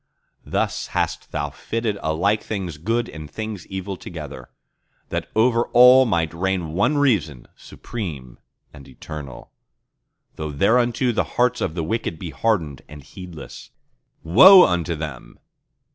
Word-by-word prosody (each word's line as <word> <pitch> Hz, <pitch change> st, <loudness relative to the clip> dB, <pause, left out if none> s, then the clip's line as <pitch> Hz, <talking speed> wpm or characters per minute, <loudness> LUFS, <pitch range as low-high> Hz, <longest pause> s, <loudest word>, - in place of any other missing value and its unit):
Thus -, -, -2 dB
hast -, -, -2 dB
Thou 75 Hz, 0 st, -3 dB
fitted 110 Hz, +4 st, -3 dB
alike 95 Hz, +7 st, 0 dB
things 90 Hz, -8 st, -5 dB
good 115 Hz, +7 st, -1 dB
and 75 Hz, -2 st, -9 dB
things 110 Hz, +1 st, -6 dB
evil 95 Hz, 0 st, -5 dB
together, -, -, -9 dB, 0.6 s
That -, -, -4 dB
over 115 Hz, +1 st, +3 dB
all 125 Hz, +1 st, +7 dB
might 85 Hz, -6 st, 0 dB
reign 90 Hz, -2 st, -2 dB
one 105 Hz, -, +1 dB
Reason, 90 Hz, -, 0 dB
supreme 75 Hz, -, -8 dB, 0.3 s
and 70 Hz, -, -13 dB
eternal; 70 Hz, 0 st, -10 dB, 0.9 s
Though 75 Hz, -1 st, -5 dB
thereunto 120 Hz, -, +2 dB
the 115 Hz, -, 0 dB
hearts 125 Hz, 0 st, +2 dB
of 80 Hz, -, -2 dB
the 85 Hz, -, -2 dB
wicked 95 Hz, -2 st, -3 dB
be 85 Hz, 0 st, -7 dB
hardened 75 Hz, -, -1 dB
and 75 Hz, -1 st, -11 dB
heedless— 90 Hz, -1 st, -11 dB, 0.5 s
Woe 180 Hz, -, +9 dB
unto 85 Hz, -1 st, -1 dB
them! 75 Hz, -5 st, -8 dB
90 Hz, 130 wpm, -22 LUFS, 80-115 Hz, 0.9 s, Woe